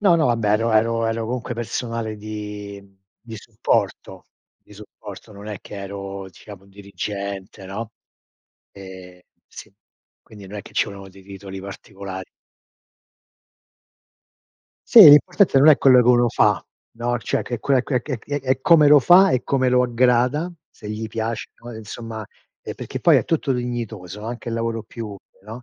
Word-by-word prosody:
No, 195 -4 +4
no, 160 - +2
vabbè 115 -4 0
ero 115 +2 +1
ero 115 +1 +2
ero 115 0 -2
comunque 125 +1 -4
personale 115 -1 -4
di 105 -1 -8 0.4
di 115 -2 -10
supporto, 110 +1 -3 0.3
di - - -21
supporto. 105 0 -12
Non 100 +1 -11
è 105 -3 -6
che - - -12
ero 100 0 -7
diciamo 95 +1 -14
dirigente, 100 0 -7
no, 105 +3 -6 0.8
ehm, 95 -2 -12 0.3
sì, - - -13 0.5
quindi 105 -2 -14
no 100 - -10
è - - -6
che - - -16
ci - - +1
volevano 100 -1 -10
dei 95 0 -17
titoli 95 0 -9
particolari. 95 -1 -9 2.6
Sì, 230 - +10
l'importante 175 +2 +5
non 145 +4 +6
è 150 - +8
quello 130 -2 +6
che 120 - +1
uno 120 -1 +4
fa, 105 -3 +2 0.3
no, 120 +1 -2
cioè - - -2
che 120 - -4
è - - -15
quella 135 -1 +2
que 125 -2 -1
è 130 -1 -5
è 145 0 -4
è 130 0 -1
come 155 -2 +6
lo 150 - +8
fa, 180 +7 +6
e 125 - 0
come 130 -2 +1
lo 125 0 +3
aggrada, 125 +6 +1 0.2
se 105 - -11
gli 110 +1 -4
piace, 110 0 -4
no, 120 0 -9
e 110 - -8
insomma, 110 0 -8 0.4
ehm, - - -6
perché - - -7
poi - - +5
è - - -3
tutto 150 -4 0
dignitoso, 115 -6 -5
anche 120 +1 -6
il 115 - -3
lavoro 115 -1 -3
più 115 +1 -8
umile, 100 -1 -14
no, 115 +4 -9
115 Hz, 170 wpm, -21 LUFS, 100-125 Hz, 2.6 s, Sì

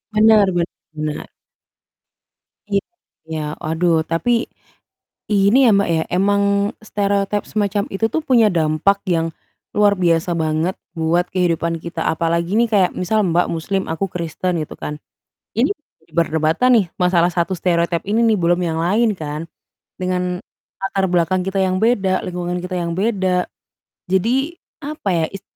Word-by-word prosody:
Benar 215 -2 +6
benar. 155 -3 -4 1.4
Iya, 160 - -5
waduh. 160 0 +1
Tapi, 230 +8 +1 0.8
ini 200 +4 +4
ya, - - +6
Mbak, 200 -3 +2
ya, 160 -1 +1
emang 200 +2 +2 0.4
stereotipe 200 0 0
semacam 205 -1 0
itu 195 +3 -1
tuh 320 - +1
punya 235 -5 +5
dampak 165 +5 +2
yang, 165 -1 +1 0.5
luar 205 -2 +3
biasa 170 -1 +1
banget 160 +3 0 0.2
buat 170 +2 +1
kehidupan 170 -2 0
kita 170 -1 -4
apalagi, 170 +3 0
nih, 235 +1 +3
kayak 195 -4 +3
misal 210 +3 +1
Mbak 175 +1 +2
muslim 190 +4 -1
aku 180 +5 -1
kristen, 170 0 -3
gitu, - - -8
kan, 150 0 -6 0.6
ini 280 +12 +2 0.4
perdebatan 160 +8 +2
nih 195 - +1
masalah 180 -1 +3
1 175 +2 -1
stereotipe 170 -1 +1
ini 215 +3 +1
nih 225 -2 +4
belum 175 +1 +2
yang 160 -2 -1
lain, 215 +7 +2
kan. 155 +2 -5 0.5
Dengan, 180 0 -1 0.4
latar 195 0 0
belakang 180 +1 +1
kita 195 0 0
yang 185 0 +1
beda, 195 -4 +2
lingkungan 180 0 -3
kita 180 +1 -5
yang 170 0 -3
beda, 190 -4 +1 0.6
jadi, 255 - +1 0.2
apa 295 -7 -5
ya, 165 -2 +1
is 195 - -9
180 Hz, 140 wpm, -19 LUFS, 165-200 Hz, 1.4 s, Benar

